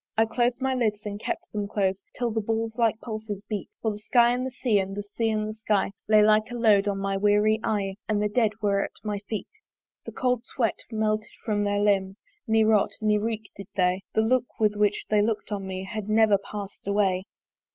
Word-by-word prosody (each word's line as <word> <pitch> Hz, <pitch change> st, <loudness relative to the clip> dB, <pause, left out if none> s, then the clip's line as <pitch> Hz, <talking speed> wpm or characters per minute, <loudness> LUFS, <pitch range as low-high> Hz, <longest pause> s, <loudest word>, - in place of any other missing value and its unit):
I 225 Hz, -, +5 dB
clos'd 240 Hz, +2 st, 0 dB
my 265 Hz, 0 st, 0 dB
lids 215 Hz, -4 st, -1 dB
and 205 Hz, 0 st, -4 dB
kept -, -, -3 dB
them 205 Hz, -1 st, -2 dB
close, 195 Hz, -2 st, 0 dB, 0.2 s
Till 240 Hz, -2 st, 0 dB
the 220 Hz, 0 st, 0 dB
balls 225 Hz, +1 st, -2 dB
like 225 Hz, -2 st, +2 dB
pulses 215 Hz, -3 st, -5 dB
beat; 210 Hz, -3 st, -4 dB
For 220 Hz, -, +1 dB
the 210 Hz, -, -7 dB
sky 235 Hz, +2 st, +4 dB
and 250 Hz, +1 st, -1 dB
the 260 Hz, -, -2 dB
sea, 245 Hz, -4 st, +1 dB
and 195 Hz, 0 st, -3 dB
the 205 Hz, -, -3 dB
sea 225 Hz, +3 st, -2 dB
and 215 Hz, -1 st, 0 dB
the 215 Hz, -, -4 dB
sky 215 Hz, -3 st, 0 dB, 0.2 s
Lay 215 Hz, -1 st, +7 dB
like 215 Hz, 0 st, +4 dB
a 245 Hz, -, -6 dB
load 210 Hz, -4 st, +4 dB
on 200 Hz, -1 st, 0 dB
my 195 Hz, 0 st, -1 dB
weary 210 Hz, +2 st, +3 dB
eye, 200 Hz, -3 st, -1 dB
And 210 Hz, -1 st, +2 dB
the 210 Hz, -, +2 dB
dead 220 Hz, +1 st, +2 dB
were 200 Hz, -1 st, +2 dB
at -, -, -4 dB
my 210 Hz, -2 st, -2 dB
feet. 215 Hz, -3 st, -3 dB, 0.6 s
The -, -, -6 dB
cold 250 Hz, -2 st, 0 dB
sweat 240 Hz, -4 st, -1 dB
melted 215 Hz, -1 st, 0 dB, 0.2 s
from 210 Hz, -2 st, +1 dB
their 205 Hz, 0 st, +1 dB
limbs, 195 Hz, -1 st, +1 dB, 0.3 s
Ne 220 Hz, 0 st, +4 dB
rot, 215 Hz, -2 st, +4 dB
ne 210 Hz, -1 st, +2 dB
reek 220 Hz, -1 st, -3 dB
did 200 Hz, -1 st, -9 dB
they; 180 Hz, 0 st, +2 dB
The 220 Hz, -, +4 dB
look 245 Hz, +2 st, 0 dB
with 210 Hz, -1 st, +2 dB
which 210 Hz, 0 st, +1 dB
they 210 Hz, -1 st, +4 dB
look'd 215 Hz, 0 st, -1 dB
on 195 Hz, -2 st, -3 dB
me, 185 Hz, 0 st, -4 dB
Had 215 Hz, +1 st, -5 dB
never 215 Hz, -2 st, +4 dB
pass'd 200 Hz, -1 st, -8 dB
away. 195 Hz, -2 st, +1 dB
215 Hz, 225 wpm, -26 LUFS, 205-225 Hz, 0.6 s, Lay